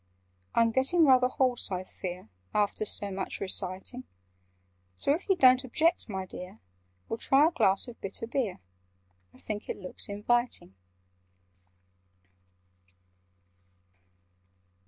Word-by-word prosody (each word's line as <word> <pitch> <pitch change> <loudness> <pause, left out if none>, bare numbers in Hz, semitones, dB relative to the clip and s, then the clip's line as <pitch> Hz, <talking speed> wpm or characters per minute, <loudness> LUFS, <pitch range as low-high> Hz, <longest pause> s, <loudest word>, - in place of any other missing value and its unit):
"I'm 230 0 +4
getting 270 +8 +3
rather 255 -2 +6
hoarse, 255 -4 0
I 185 0 -2
fear, 180 - -7 0.3
After 210 +1 +1
so 205 -1 -1
much 190 0 -3
reciting: 190 +6 -2 0.9
So, 280 - +1
if 345 +6 -5
you 385 - +5
don't 255 -5 +6
object, 315 +4 +1
my 190 -2 -3
dear, 180 -5 -9 0.5
We'll 225 - -4
try 280 +3 +4
a - - 0
glass 195 - +2
of 240 - -11
bitter 195 +3 -5
beer— 230 - -2 0.7
I - - -19
think 210 -1 -6
it - - -3
looks 185 0 -7
inviting." 210 - -1
230 Hz, 115 wpm, -29 LUFS, 190-260 Hz, 0.9 s, rather